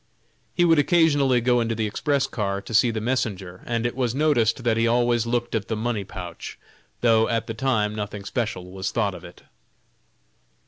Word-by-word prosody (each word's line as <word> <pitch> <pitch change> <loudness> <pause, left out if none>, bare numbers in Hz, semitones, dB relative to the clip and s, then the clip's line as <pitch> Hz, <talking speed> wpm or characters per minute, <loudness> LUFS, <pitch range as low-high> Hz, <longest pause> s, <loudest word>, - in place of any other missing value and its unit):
He 175 - +3
would 165 -2 +5
occasionally 145 -5 +3
go 120 0 +2
into 115 -1 -1
the 110 0 -1
express 140 +6 0
car 100 -3 -2
to 100 +3 -9
see 115 +2 +5
the 110 -1 -2
messenger, 105 -6 -3
and 115 0 -1
it 120 - -1
was 125 -2 -1
noticed 130 -6 +2
that 115 -2 +2
he 115 +1 +2
always 120 -1 +2
looked 120 0 -1
at 110 -3 -2
the 110 - -2
money 110 -1 -2
pouch, 90 -3 -8 0.4
though 115 -2 +4
at 115 -1 0
the 115 - -5
time 110 -4 0
nothing 105 -1 -5
special 95 -7 -3
was 95 0 -3
thought - - 0
of - - -10
it. - - -13
115 Hz, 190 wpm, -24 LUFS, 105-125 Hz, 0.4 s, would